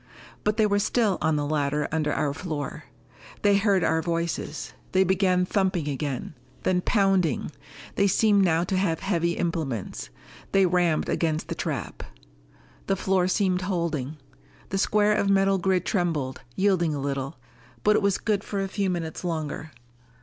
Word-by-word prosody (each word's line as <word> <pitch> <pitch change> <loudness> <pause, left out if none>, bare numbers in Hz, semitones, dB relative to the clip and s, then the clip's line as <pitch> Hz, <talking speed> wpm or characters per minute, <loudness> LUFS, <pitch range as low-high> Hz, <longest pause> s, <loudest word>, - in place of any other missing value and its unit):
But 210 0 +1
they 220 - +4
were 205 -1 +2
still 210 -1 +1
on 160 - +2
the 145 -1 0
ladder 145 0 0
under 155 -2 0
our 145 -2 0
floor. 155 -2 -5 0.6
They 205 -1 +5
heard 200 -3 +2
our 160 0 +2
voices: 170 0 -3 0.2
they 190 0 +5
began 185 -1 +2
thumping 185 -5 0
again. 140 -1 -3 0.3
Then 180 -1 +2
pounding. 190 - +1 0.5
They 200 - +4
seemed 205 0 +4
now 165 -2 +3
to 185 +1 -1
have 175 -4 0
heavy 170 -3 0
implements. 155 - -3 0.4
They 195 -1 +5
rammed 175 -3 +2
against 160 -1 -1
the - - -1
trap. - - -4 0.9
The 195 - +2
floor 190 -1 +1
seemed 185 -1 +1
holding. 165 -6 -2 0.5
The 195 - -1
square 210 +1 +3
of 200 -1 +1
metal 195 0 +3
grid 185 0 +1
trembled, 160 -9 -1
yielded 190 -4 +2
a - - -2
little. 135 -1 -3 0.5
But 210 0 +4
it - - +3
was 200 -2 +2
good 210 -2 -1
for 200 - -3
a 195 - -1
few 195 0 -1
minutes 170 -2 -3
longer. 160 -2 -3
180 Hz, 160 wpm, -26 LUFS, 155-195 Hz, 0.9 s, They